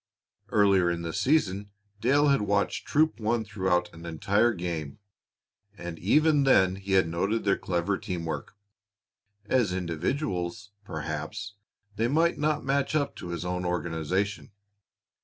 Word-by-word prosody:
Earlier 100 -4 +4
in 85 0 -2
the 85 - -4
season, 105 -4 +1 0.3
Dale 140 +6 +3
had 140 -4 +3
watched 100 0 0
Troop 155 -1 +2
One 110 +1 0
throughout 95 -4 0
an 85 - -12
entire 100 +8 +2
game, 85 -7 -4 0.8
and 85 -1 -7
even 150 - +4
then 95 -8 +4
he 100 0 -4
had 95 -3 +4
noted 95 +7 -1
their 100 - +3
clever 90 +2 -1
team 85 -2 -4
work. 80 - -5 0.9
As 115 -3 +2
individuals, 90 - -2
perhaps, 80 +5 -5 0.4
they 115 - +2
might 165 +6 +2
not 150 -1 0
match 140 +2 0
up 145 -2 0
to - - -7
his 85 0 -4
own 90 0 -2
organization. 90 +3 -2
100 Hz, 140 wpm, -27 LUFS, 85-120 Hz, 0.9 s, Earlier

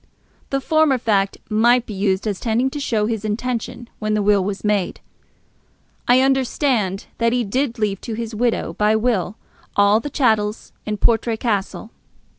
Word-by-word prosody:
The 275 - 0
former 310 -1 +2
fact 200 -4 0
might 235 +3 +3
be 215 - -7
used 195 0 0
as 205 -3 -2
tending 240 +3 0
to 295 - -5
show 225 -6 0
his 220 -1 -2
intention 240 +2 -3
when 215 0 -1
the 210 - 0
will 205 -1 +3
was 200 +1 -4
made. 210 -3 0 1.1
I 250 +1 +5
understand 260 -6 +1
that 230 0 +2
he 245 -1 +1
did 250 +4 -1
leave 205 -3 -1
to 230 - -5
his 230 0 -5
widow 235 +2 -1
by 210 +1 +2
will 215 -4 0 0.4
all 205 +1 +4
the 290 - -5
chattels 220 -6 0
in 210 0 -2
Portray 230 +1 +1
Castle. 215 0 -2
220 Hz, 165 wpm, -20 LUFS, 210-245 Hz, 1.1 s, I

